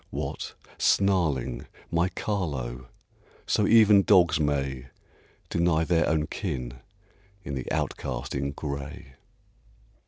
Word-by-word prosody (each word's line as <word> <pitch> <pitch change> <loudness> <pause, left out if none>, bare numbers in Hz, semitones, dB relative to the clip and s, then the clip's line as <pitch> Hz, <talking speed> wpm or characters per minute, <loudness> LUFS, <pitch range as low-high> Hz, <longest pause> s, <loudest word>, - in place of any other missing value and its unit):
What! - - -5 0.2
snarling, 75 -11 +1 0.2
my 85 +2 +2
Carlo! 70 - -3 0.6
So 105 - +2
even 105 -3 +7
dogs 90 -6 +4
may 70 -3 -1 0.6
Deny 85 -1 +2
their 85 0 +2
own 75 -1 +1
kin 60 -3 -5 0.6
in 70 - -5
the 65 -2 -4
outcast - - -3
in 70 0 -1
gray. 70 +2 -6
75 Hz, 100 wpm, -27 LUFS, 65-90 Hz, 0.6 s, even